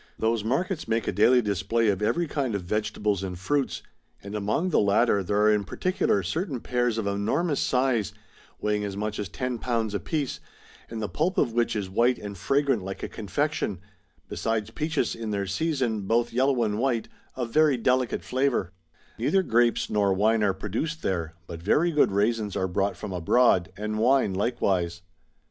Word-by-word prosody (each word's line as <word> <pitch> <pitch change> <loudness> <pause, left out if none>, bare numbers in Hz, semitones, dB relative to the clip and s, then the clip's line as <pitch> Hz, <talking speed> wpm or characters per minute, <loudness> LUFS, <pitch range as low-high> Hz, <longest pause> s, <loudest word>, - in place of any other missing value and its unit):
"^ - - -26
Those 110 -1 0
markets 155 - -1
make 115 0 0
a - - +2
daily 125 +4 +4
display 105 +3 +1
of 100 0 0
every 170 +11 +1
kind 135 -7 -2
of 100 - -3
vegetables 105 0 -1
and 95 -2 -4
fruits; 130 +10 -1 0.4
and 100 +1 -8
among 105 - -1
the - - +4
latter 100 +1 +3
there 100 +2 0
are 105 0 +5
in 105 -1 +1
particular 100 - 0
certain 150 - -2
pears 120 -1 0
of 110 - -2
enormous 110 - 0
size, 125 -6 +1 0.5
weighing 105 0 0
as 100 -1 -4
much 105 +1 -3
as 100 -3 -3
ten 125 +2 -3
pounds 115 -4 -1
apiece, 135 - -2 0.5
and 110 -1 -5
the - - -1
pulp 175 - -1
of 120 -5 +2
which 120 -1 +1
is 100 -3 -2
white 120 +6 +2
and 100 -2 -8
fragrant 135 -1 +1
like 95 +1 -6
a - - -1
confection; 110 - -2 0.5
besides 110 -1 -2
peaches 155 -2 -1
in 115 -1 -5
their 100 -1 -1
season, 120 - -1
both 120 +2 +1
yellow 130 0 +2
and 105 -1 -1
white, 120 -3 0 0.3
of 120 -3 -3
very 150 -2 +4
delicate 125 +1 +1
flavour,' 130 -9 0 0.5
Neither 190 +11 +2
grapes 120 -5 +2
nor 100 -2 +2
wine 110 +3 +3
are 100 -2 +2
produced 120 - -3
there, 85 -4 -2
but 85 -1 -8
very 155 - +2
good 150 -8 +3
raisins 105 +1 0
are 95 - 0
brought 100 +2 -1
from 105 -3 -6
abroad, 95 +1 +3
and 105 +1 -3
wine 125 -3 +3
likewise. 95 -5 0
110 Hz, 180 wpm, -26 LUFS, 100-130 Hz, 0.5 s, are